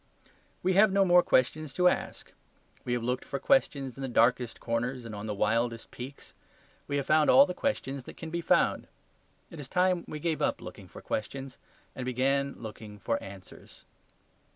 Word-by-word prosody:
We 185 +1 +2
have 205 +2 +5
no 195 0 +4
more 180 -1 +6
questions 155 +1 +1
left 135 - -14
to 180 - +5
ask. - - -2 0.5
We 120 - -1
have 120 -1 -1
looked 125 +2 -1
for 140 - -4
questions 140 - +1
in - - -7
the 135 - -2
darkest 120 0 +2
corners 120 +2 -2
and 115 - -7
on 105 +1 -6
the 105 - -2
wildest 115 +2 0
peaks. 130 +3 -9 0.5
We 145 - -1
have 140 - -1
found 155 0 +4
all 130 - +8
the 180 - -4
questions 140 - -2
that - - -11
can 160 - -7
be 170 +1 -2
found. - - +2 0.6
It 165 - -10
is 135 -3 -8
time 180 -1 +2
we 155 - -5
gave 160 +1 -2
up - - +1
looking - - -10
for - - -12
questions 135 +4 -4 0.4
and 130 - -5
began 135 +2 0
looking 110 -2 -9
for 115 +2 -2
answers. 95 -1 -13
135 Hz, 190 wpm, -29 LUFS, 120-160 Hz, 0.6 s, all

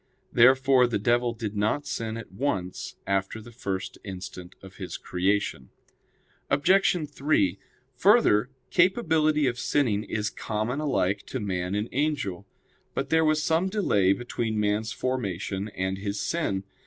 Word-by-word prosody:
Therefore 130 +1 +5
the 120 - 0
devil 120 +3 +2
did 110 -2 -5
not 110 +8 0
sin 115 -5 -3
at 115 - -9
once 95 -5 -3
after 100 +2 -1
the 115 +2 -12
first 95 -4 -4
instant 95 -2 -8
of 95 0 -14
his 95 -3 -5
creation. 95 -7 -1 0.8
Obj. 175 +2 +3
3: 135 - +1 0.4
Further, 135 - +4 0.2
capability 160 -6 +3
of 125 -1 -1
sinning 115 -9 +1
is 105 -1 -2
common 110 +5 -3
alike 100 -10 0
to 130 - -4
man 95 -2 -2
and 105 +2 -1
angel. 125 - -1 0.5
But 135 - -2
there 160 0 +4
was 155 0 +2
some 165 +5 +2
delay 105 - +2
between 115 0 -3
man's 105 +1 0
formation 100 -5 -3
and 95 -1 -3
his 100 0 -3
sin. 100 - -1
110 Hz, 140 wpm, -26 LUFS, 100-145 Hz, 0.8 s, Therefore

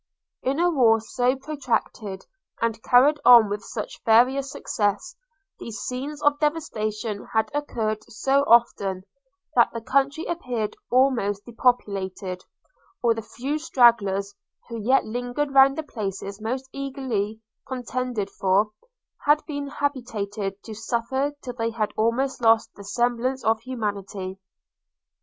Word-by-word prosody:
In 270 +4 -1
a 350 - +4
war 235 -7 +4
so 245 +4 0
protracted, 255 -8 -3 0.3
and 225 -1 -1
carried 275 +6 +5
on 235 -4 +8
with 205 +1 -3
such 215 - -6
various 260 +5 +4
success, 205 - -2 0.4
these 230 -1 -7
scenes 280 +4 -5
of 290 0 +3
devastation 220 -9 -2
had 220 0 +1
occurred 225 -7 -2
so 270 +5 +2
often, 200 -5 +3 0.5
that 235 - +5
the 230 - -3
country 275 +7 0
appeared 245 -10 -3
almost 235 -6 +2
depopulated, 200 -6 -1 0.6
or 235 -1 +4
the 225 - -5
few 260 +7 -4
stragglers, 210 -9 +3 0.4
who 230 -1 -5
yet 260 +6 +3
lingered 245 +5 -3
round 270 +1 +6
the 315 - -2
places 200 -5 -5
most 255 +4 -3
eagerly 260 -7 -3 0.3
contended 250 -5 -3
for, 195 +3 +2 0.6
had 295 +1 +4
been 285 -2 -4
habituated 215 -8 -3
to 220 - -8
suffer 235 +6 -1
till 245 - -5
they 230 -1 -1
had 225 -2 -2
almost 250 +4 0
lost 225 -1 +4
the 200 - -12
semblance 245 +4 -1
of 220 0 +2
humanity. 200 -6 -4
235 Hz, 130 wpm, -24 LUFS, 215-270 Hz, 0.6 s, on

